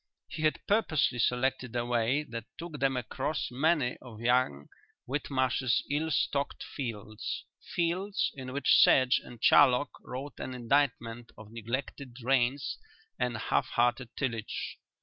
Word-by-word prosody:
He 155 - -6
had 155 -1 +1
purposely 155 - +2
selected 125 0 0
a 120 0 0
way 120 +4 +1
that 115 -5 -7
took 165 -3 -7
them 135 -1 +1
across 125 +5 -2
many 140 -1 +1
of 115 -4 -12
young 120 - +1 0.4
Whitmarsh's 130 -2 0
ill 155 +3 0
stocked 140 -1 0
fields, 110 -5 -5 0.2
fields 185 +4 -1
in 130 -2 -7
which 140 +2 +4
sedge 130 -1 +5
and 120 - -12
charlock 140 0 +6
wrote 135 +3 -7
an 130 - -5
indictment 120 -2 0
of 110 -1 -12
neglected 120 +3 -5
drains 130 +2 0 0.4
and 120 -2 0
half 130 +3 0
hearted 120 0 +1
tillage. 115 -6 -3
130 Hz, 130 wpm, -30 LUFS, 120-145 Hz, 0.4 s, charlock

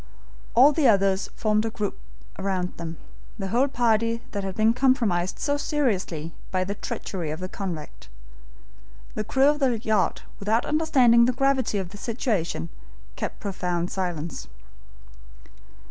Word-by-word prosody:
All 265 +5 +8
the 295 -2 +3
others 195 -3 +3
formed 215 -1 +1
a 225 - -1
group 210 -2 -4 0.4
round 190 -2 -2
them, 165 -1 -6 0.4
the 195 -3 -4
whole 245 +7 +3
party 230 -2 +1
that 200 -1 -3
had 190 -1 -4
been 220 +1 +4
compromised 230 -9 +2
so 285 0 0
seriously 195 - -1 0.2
by 185 -1 0
the 195 +2 -3
treachery 185 -4 -5
of 155 +2 -4
the 185 - -4
convict. 185 -6 -6 1.0
The 215 - -2
crew 265 +6 +3
of 295 0 +1
the 255 -5 +2
yacht, 215 -4 0 0.2
without 220 +4 +1
understanding 255 -7 +4
the 250 - +2
gravity 265 -4 +1
of 190 -3 -3
the 205 - -10
situation, 205 - -2 0.5
kept - - -4
profound 180 -3 -2
silence. 175 -4 -3
210 Hz, 145 wpm, -25 LUFS, 185-245 Hz, 1.0 s, All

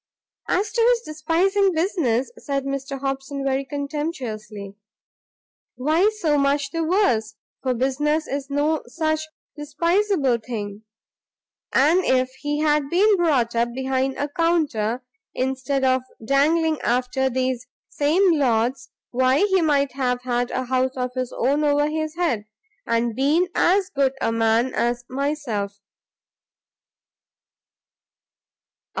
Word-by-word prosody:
"As 400 +3 0
to 470 - 0
his 485 -2 +2
despising 370 +4 +1
business," 315 - 0
said 280 - -3
Mr 275 0 -4
Hobson, 270 0 -3
very 270 0 0
contemptuously, 260 - -5 1.0
"why 315 +10 +2
so 305 -7 +1
much 280 0 +1
the 330 +1 -1
worse, 250 - +1 0.3
for 255 -2 0
business 295 +5 0
is 275 0 -4
no 295 +2 +1
such 315 -1 -1 0.3
despiseable 335 - +1
thing. 215 -2 -6 0.9
And 320 +7 +4
if 255 0 +2
he 295 0 -1
had 300 -2 +2
been 405 +5 +4
brought 280 -10 +1
up 235 +1 +1
behind 265 +1 -1
a 285 +2 -1
counter, 285 -8 0 0.3
instead 265 +1 -1
of 260 0 +3 0.2
dangling 310 +4 +2
after 255 +2 0
these 255 -1 -2 0.2
same 345 +6 +2
Lords, 255 +1 0 0.2
why 260 +3 +2
he 380 -3 +2
might 285 -3 +2
have 250 -2 -1
had 245 -1 -1
a 255 - -2
house 260 +1 0
of 250 0 -2
his 255 -1 -3
own 280 +5 +1
over 290 0 +3
his 310 0 -3
head, 310 -12 0 0.4
and 230 -1 0
been 305 +8 +2
as 375 +1 +2
good 275 -2 +1
a - - 0
man 225 +2 +2
as 240 0 -1
myself." 255 -8 -3
275 Hz, 125 wpm, -23 LUFS, 250-315 Hz, 1.0 s, And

